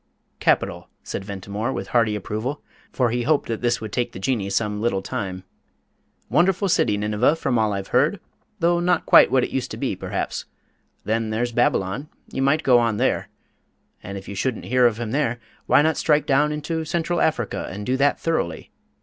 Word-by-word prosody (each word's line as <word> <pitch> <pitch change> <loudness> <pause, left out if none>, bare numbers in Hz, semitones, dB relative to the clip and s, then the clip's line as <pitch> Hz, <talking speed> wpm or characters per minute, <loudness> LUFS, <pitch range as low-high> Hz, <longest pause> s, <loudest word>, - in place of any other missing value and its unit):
"Capital," - - +1
said - - -5
Ventimore, 100 +4 -4
with 95 -5 -5
hearty 115 -3 +2
approval, 110 +8 -4 0.3
for 125 -3 +1
he 120 +1 0
hoped 150 +4 +1
that 115 - -2
this 120 -1 +1
would 110 -1 -7
take 120 +1 -2
the - - -7
Jinnee 100 -2 -1
some 105 0 -1
little 100 -5 0
time. 95 -2 -4 0.8
"Wonderful 180 - +2
city, 105 -10 +2
Nineveh, 105 +7 +2
from 125 -7 0
all 110 -1 +2
I've 100 -1 -4
heard 150 +10 +2 0.4
though 170 0 +3
not 175 -1 +1
quite - - +7
what 130 -2 +3
it - - -3
used 135 - -2
to - - -6
be, - - -2
perhaps. - - -4 0.6
Then 110 0 0
there's 120 +3 -1
Babylon 120 +3 0 0.2
you 135 - -3
might 140 +3 +2
go 125 -2 +5
on 115 -3 +1
there. - - 0 0.7
And 100 +1 -7
if 95 - -10
you - - -6
shouldn't 115 +4 -2
hear 125 0 +4
of 115 -1 -2
him 115 -2 -3
there, 125 -3 0 0.3
why 145 - +5
not 160 0 +1
strike 150 -1 +2
down 145 +1 +3
into 150 +2 -3
Central 170 +2 -1
Africa, 160 - 0
and 100 +2 -6
do 130 - +1
that 145 +1 +2
thoroughly? 85 - -2
120 Hz, 190 wpm, -23 LUFS, 105-150 Hz, 0.8 s, quite